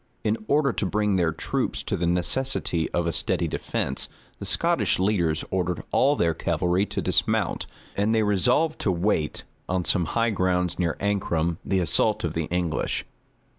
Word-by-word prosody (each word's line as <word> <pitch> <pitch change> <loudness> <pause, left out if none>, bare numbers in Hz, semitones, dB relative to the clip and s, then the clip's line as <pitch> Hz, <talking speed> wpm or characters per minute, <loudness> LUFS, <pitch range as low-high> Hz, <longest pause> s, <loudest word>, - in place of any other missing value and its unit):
In 110 +1 +1
order 140 -3 +3
to - - -1
bring 105 +1 +1
their 85 -3 +2
troops 80 - -2
to - - -2
the 85 - -1
necessity 90 -1 0
of 85 - -1
a 85 - -1
steady 80 - 0
defence, - - -2 0.3
the - - -2
Scottish - - +2
leaders 90 -5 +1
ordered 90 -2 -1
all 140 +2 +4
their 85 - +2
cavalry 90 +5 0
to - - -3
dismount, - - +1 0.3
and 105 +3 +1
they 110 - +3
resolved 125 - +2
to 100 - +1
wait, 85 -3 0 0.3
on 90 -1 0
some 85 +1 +2
high 115 +7 +1
grounds 90 -3 0
near 85 -2 0
Ancram, 85 -5 0
the 95 - +1
assault 85 +6 +1
of 80 -3 -1
the 80 -1 -1
English. 85 -1 -1
90 Hz, 170 wpm, -25 LUFS, 85-105 Hz, 0.3 s, all